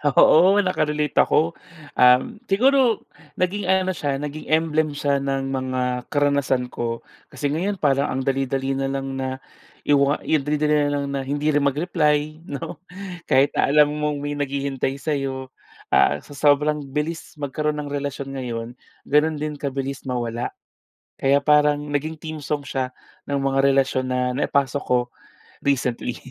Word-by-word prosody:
Oo, 185 +6 +6
naka-relate 150 -5 -1
ako. 165 +2 +3 0.4
Um, 125 +11 +4
siguro 250 +2 +3 0.3
naging 190 +2 -1
ano 190 0 +2
siya, 145 -6 -2
naging 150 +1 -6
emblem 155 -1 +1
siya 140 -1 +1
ng 135 -1 -2
mga 130 -1 -2
karanasan 140 -3 +1
ko. 115 -1 -3 0.3
Kasi 145 - -3
ngayon 190 +5 -1
parang 140 -1 +2
ang 135 - -1
dali-dali 135 0 -1
na 135 0 -1
lang 135 0 -3
na 130 0 -3 0.4
iwa 140 0 +3
i 155 - +2
ang 135 - -8
dali-dali 150 0 +2
na - - -1
lang 140 0 -1
na 140 - -2
hindi 145 +2 0
rin 145 - +3
mag-reply 155 +1 0
'no, 145 +3 -6 0.5
kahit 140 +2 +4
na - - +3
alam 150 +1 +5
mong 150 -1 -1
may 145 0 -3
naghihintay 140 -1 -2
sa'yo, 135 -3 -3 0.4
ah, 75 - +4
sa - - -16
sobrang 150 +1 +2 0.2
bilis 160 +2 -3
magkaroon 150 +1 -2
ng 145 - -7
relasyon 140 -1 -4
ngayon, 120 -4 -4 0.4
gano'n 150 +2 +2
din 150 -1 -4
kabilis 135 -1 -4
mawala. 120 -1 -3 0.6
Kaya 140 +1 +3
parang 150 0 +3
naging 155 +2 -2
theme 155 -1 -6
song 150 0 -2
siya 130 -1 -2 0.3
ng 140 -1 -1
mga 135 0 +2
relasyon 135 -1 +2
na 125 - +1 0.2
naipasok 140 -1 0
ko, 125 -1 +3 0.6
recently. 125 -3 -1
145 Hz, 150 wpm, -23 LUFS, 135-150 Hz, 0.6 s, Oo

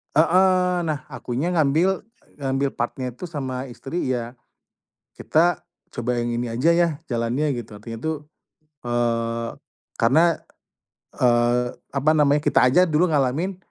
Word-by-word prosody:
Heeh, 180 +2 +4
nah 150 -4 -2
akunya 135 +9 -3
ngambil 165 +4 +2 0.4
ngambil 135 0 0
part-nya 125 +1 -3
itu 150 +9 -8
sama 135 -4 -4
istri 135 +6 -4
ya, 120 -2 -2 0.8
kita 170 +3 +1 0.3
coba 120 +1 -2
yang 120 0 -1
ini 120 0 -2
aja 125 +9 +2
ya 170 0 +3 0.2
jalannya 125 +4 -1
gitu 105 -2 -11
artinya 115 +2 -8
tuh, 160 +2 -2 0.7
eee, 115 -1 -1 0.5
karena, 160 +8 +4 0.8
eee, 120 0 +3 0.3
apa 140 +2 +2
namanya 150 -1 +3
kita - - +4
aja 180 +9 +5
dulu 155 +3 +3
ngalamin, 155 +6 0
135 Hz, 125 wpm, -23 LUFS, 120-160 Hz, 0.8 s, aja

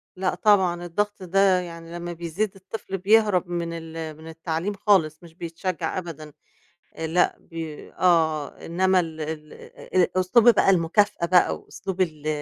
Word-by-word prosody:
لأ 185 -1 -1
طبعًا، 185 -4 +3
الضغط 205 +3 -2
ده 190 0 +3
يعني 165 -1 -8
لمّا 175 0 -5
بيزيّد 170 +5 -2
الطفل 195 0 -6
بيهرَب 200 -2 +3
من 170 -1 -3
ال 160 -1 -7
من 160 - -12
التعليم 165 +4 -3
خالص، 180 -6 +2
مش 165 -1 -14
بيتشجّع 170 0 -4
أبدًا 155 -4 -7 0.6
آآ 160 0 -3
لأ، 175 +3 +2
بي 160 -2 -8
آه، 160 -5 +2 0.2
إنما 185 +2 +2
ال 160 -2 -4
ال 155 0 -6 0.4
آآ 185 -1 +4
أسلوب 235 +6 +5
بقى 205 -3 +4
المكافأة 180 +1 +2
بقى 180 0 +4
وأسلوب 190 -1 -5
ال 155 -4 -2
175 Hz, 150 wpm, -24 LUFS, 160-190 Hz, 0.6 s, أسلوب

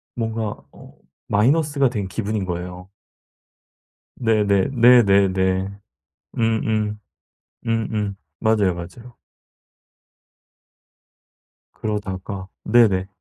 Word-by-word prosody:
뭔가 110 -2 -2 0.2
어 - - -16 0.3
마이너스가 140 +5 +2
된 105 -5 -3
기분인 105 0 -3
거예요. 90 +1 -6 1.3
네네 105 -5 +2
네네네. 100 -5 +4 0.6
음음. 110 -2 0 0.7
음음. 110 -3 -1 0.2
맞아요, 105 -5 +2
맞아요. 115 +8 -10 2.6
그러다가 100 -2 -4 0.2
네네. 105 -5 +3
105 Hz, 165 characters per minute, -21 LUFS, 95-115 Hz, 2.6 s, 네네네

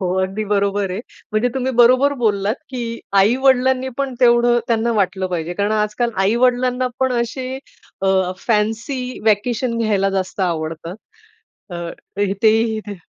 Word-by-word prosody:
हो, 180 -1 -1
अगदी 195 +3 -3
बरोबर 200 -1 0
आहे. 185 +3 -3 0.3
म्हणजे 220 +3 +2
तुम्ही 260 0 -1
बरोबर 255 +4 +5
बोललात 205 -1 +1 0.2
की 255 -2 -4 0.4
आई-वडिलांनी 260 +4 +3
पण 275 -2 -2
तेवढं 240 0 +4
त्यांना 230 0 +1
वाटलं 190 -2 0
पाहिजे. 175 -2 -3
कारण 205 +3 0
आजकाल 215 +3 0
आई-वडिलांना 250 +3 +2
पण 260 -1 +2
असे 255 +2 -4 0.4
अ, 195 - +1 0.3
फॅन्सी 225 +5 -1
व्हॅकेशन 230 +3 +1
घ्यायला 205 -3 +1
जास्त 190 0 -3
आवडतात. 165 0 -3 0.7
अ, 175 - -5 0.5
इथेही 220 +3 +2
ते 205 - -5
220 Hz, 135 wpm, -19 LUFS, 195-250 Hz, 0.7 s, बरोबर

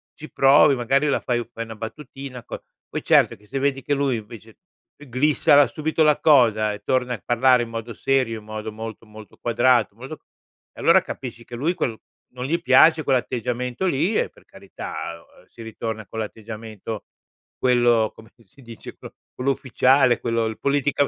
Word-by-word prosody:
ci 155 - -11
provi, 135 +1 +5
magari 135 +4 +1
la - - +1
fai 120 -1 -2
fai 115 - -5
una 110 0 -9
battutina 125 +2 -8
co - - -7 0.3
poi, - - -5
certo, - - +4
che 105 - -23
se 135 +5 -3
vedi 135 -1 -1
che 145 - -1
lui, 140 -2 0
invece, 110 0 -12 0.4
eclissa 145 +1 +3
subito 160 +1 -2
la 150 -1 +3
cosa 110 -8 +4
e 105 - -8
torna 125 -1 0
a 105 - -13
parlare 125 +1 +3
in 115 - -8
modo 115 0 -6
serio, 125 -1 0
in 105 - -17
modo 110 0 -6
molto, 110 +1 -8
molto 105 -1 -14
quadrato, 120 -1 +2
molto 130 +7 -9 0.5
e, - - -11
allora, - - +6
capisci 120 -3 -8
che 120 - -9
lui 150 +9 0
quel 115 -8 -2 0.4
non 125 0 -6
gli 165 +5 -1
piace 155 +5 +5
quell'atteggiamento 125 - -1
lì 175 +7 0
e, - - +1
per - - -22
carità, 85 +1 -8 0.2
uhm, - - -22
si - - -14
ritorna 110 -1 -5
con 110 - -10
l'atteggiamento 110 0 -7 0.5
quello, 120 -3 +3
com'è 110 - -15
che 115 -1 -24
si 140 +6 -20
dice, 115 -2 -11
pro - - -12 0.2
quello 130 +2 0
ufficiale, 130 -1 +3
quello 115 -1 0
il 110 0 -5
politica 145 0 +1
120 Hz, 180 wpm, -22 LUFS, 110-135 Hz, 0.5 s, allora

